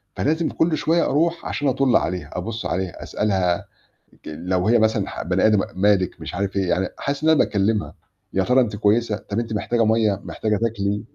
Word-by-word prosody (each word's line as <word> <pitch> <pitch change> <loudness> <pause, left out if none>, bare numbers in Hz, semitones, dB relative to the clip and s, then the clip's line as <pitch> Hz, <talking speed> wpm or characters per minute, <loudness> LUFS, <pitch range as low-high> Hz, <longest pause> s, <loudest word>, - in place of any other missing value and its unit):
فلازم 160 +2 0
كل 160 -1 +1
شوية 170 +1 +2
أرُوح 170 +4 0
عشان 145 - -2
أَطُّل 135 -1 +2
عليها، 90 -1 0
أبُصّ 110 +5 -5
عليها، 90 -2 -3
أسألها 95 -4 0 0.6
ج - - -5
لو 90 +4 -2
هي 120 0 +5
مثلًا 110 -2 +1
ح - - -6
بني 90 +3 +2
آدم 110 -1 +4
م - - 0 0.2
مالِك 100 -2 +2
مش - - -7
عارف 100 +1 -2
إيه، 95 -2 0
يعني 95 +1 +1
حاسس 140 +1 -3
إن 160 - +3
أنا 160 - +5
باكلّمها 105 +1 +1 0.4
"يا 95 - +1
ترى 125 +4 +4
أنتِ 105 -5 -1
كويسة، 110 +1 +2
طَب 105 0 -5
أنتِ 115 -1 -2
محتاجة 115 +2 0
مَيَّة، 110 -3 +2
محتاجة 105 -1 -1
تاكلي." 105 -1 -1
105 Hz, 200 wpm, -22 LUFS, 95-120 Hz, 0.6 s, هي